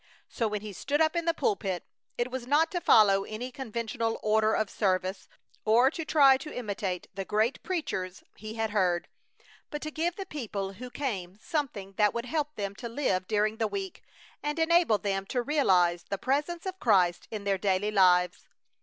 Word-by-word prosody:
So 230 - -1
when 210 -1 -3
he 210 -1 -7
stood 285 +9 -1
up 315 +1 +3
in 340 -1 0
the 335 - +4
pulpit 195 - -1 0.3
it 240 +1 -1
was 255 -1 -5
not 310 +4 +3
to 355 - -2
follow 195 -7 +5
any 225 +5 -6
conventional 230 -2 -3
order 215 0 +3
of 215 - +1
service, 185 -1 -1 0.3
or 240 +5 +5
to 325 - -4
try 280 -4 +6
to 300 +3 -8
imitate 200 -6 -3
the 195 - -4
great 215 +6 0
preachers 190 - -3
he 215 +2 -8
had 225 -1 -1
heard, 180 -4 +1 0.6
but 295 - -4
to 310 - -4
give 335 +3 -1
the 390 - -5
people 210 - -4
who 250 +6 -8
came 200 -10 -4
something 230 - -3
that 210 0 +3
would 235 +1 -2
help 300 +3 -2
them 200 -1 -3
to 235 - -6
live 210 -8 -1
during 215 0 +1
the 225 - +1
week 385 - -5 0.4
and 295 +1 -2
enable 325 -7 +4
them 195 -1 -2
to 245 +2 -1
realize 185 - +3
the 200 - -4
Presence 295 - -1
of 375 0 -5
Christ 180 -6 +3
in 215 -2 -5
their 200 -1 0
daily 195 +2 +1
lives. 180 -3 +3
220 Hz, 190 wpm, -29 LUFS, 195-290 Hz, 0.6 s, try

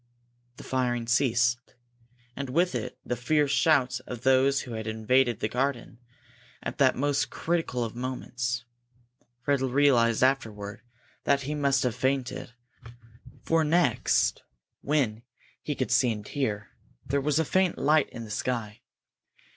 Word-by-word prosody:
The - - -10
firing 125 -2 -1
ceased, 120 -1 +1 0.6
and 140 -2 -5
with 170 +6 +1
it 120 -3 -4
the 120 - -1
fierce 145 +4 +1
shouts 130 -5 +3
of 125 -2 -8
those 135 +1 +4
who 125 - -9
had 110 0 -5
invaded 115 +2 +2
the - - +1
garden 125 0 -2 0.6
at - - -5
that 130 -2 +4
most 145 +1 0
critical 165 -8 -1
of 115 0 -5
moments. 125 -1 -3 0.8
Fred 140 0 +1
realized 130 -3 +3
afterward 110 -6 -1 0.4
that 140 0 +3
he 145 +3 -3
must 140 -2 +1
have 125 -3 0
fainted, 130 -1 -2 0.9
for 165 - +2
when 155 -2 +1
next 175 +2 +2 1.2
he 150 - -3
could 130 - -2
see 125 0 +4
and 105 -2 -6
hear, 110 -8 -3 0.3
there 140 +2 0
was 145 +1 +1
a 160 - +2
faint 185 +2 +1
light 150 +1 +3
in 115 - -8
the 105 - -10
sky. 110 -1 -3
130 Hz, 140 wpm, -27 LUFS, 120-140 Hz, 1.2 s, those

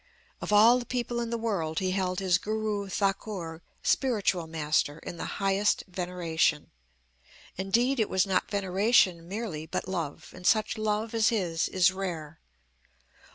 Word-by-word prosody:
"Of - - -4
all 225 +4 +7
the 245 - -6
people 240 -1 -2
in 235 -1 -2
the 235 - -1
world 190 -9 -2
he 185 -1 0
held 185 -1 -1
his 185 -2 +2
Guru 215 -2 -2
Thakur 190 -4 -2 0.2
(spiritual 205 -10 +1
master) 155 -2 0
in 170 - -8
the - - -5
highest 195 +1 +1
veneration. 175 -4 -1 0.8
Indeed 235 +8 +1
it 220 - +1
was 190 +1 +2
not 190 -2 0
veneration 195 -3 +2
merely 190 -6 -5
but - - -3
love; 160 -4 -4
and 180 0 -5
such 215 -1 +3
love 215 +1 -1
as 225 -1 +3
his 175 -8 0
is 185 0 +4
rare. 170 -5 -5
190 Hz, 150 wpm, -28 LUFS, 170-215 Hz, 0.8 s, all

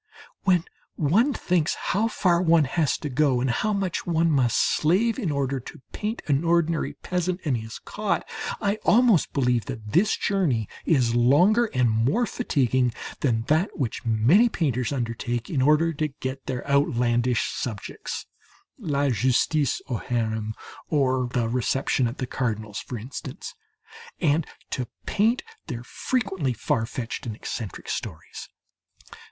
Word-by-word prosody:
When 180 -4 +4 0.3
one 200 - +3
thinks 175 - 0
how 210 +4 0
far 180 -6 +2
one 165 -3 +5
has 145 +2 +1
to - - -5
go 135 -1 +2
and 125 0 +1
how 215 - 0
much 195 -4 -2
one 165 -1 +2
must 125 -5 +2
slave 205 - +2
in 185 -11 -1
order 140 -1 -1
to 130 +4 -11
paint 215 +2 -4
an 145 +1 +1
ordinary 170 -1 +1
peasant 180 0 -2
and 140 -4 +1
his 110 -1 -6
cot, 200 -5 -2 0.3
I 205 0 0
almost 230 -6 +4
believe 125 -4 +1
that 105 -1 -7
this 205 +6 +3
journey 150 - 0 0.2
is 125 -8 +3
longer 170 - +4
and 125 - +1
more 115 - +2
fatiguing 130 - 0 0.2
than 115 -5 +1
that 155 - +1
which 125 -7 -2
many 120 - +4
painters 130 - -1
undertake 120 -2 -3
in 140 -6 +1
order 155 +4 +4
to 155 +1 -1
get 135 -1 -6
their 125 +1 -4
outlandish 125 -4 +2
subjects 110 -5 -5 0.5
"La 140 -2 0
Justice 130 +5 +1
au 125 - -1
Harem" 110 -2 -2 0.3
or 130 -4 +2
"The 120 -2 0
Reception 125 +2 +1
at 115 - -5
the 130 - -2
Cardinal's," 110 -5 -3
for 125 - -6
instance 130 - -7 0.7
and 155 -1 +2 0.2
to 125 -2 -2 0.2
paint 225 +5 +2 0.2
their 120 -6 -5
frequently 190 - -1
far 115 -1 -1
fetched 120 0 -5
and 110 - -4
eccentric 110 -2 -6
stories. 80 -8 -6
140 Hz, 145 wpm, -25 LUFS, 120-170 Hz, 0.7 s, one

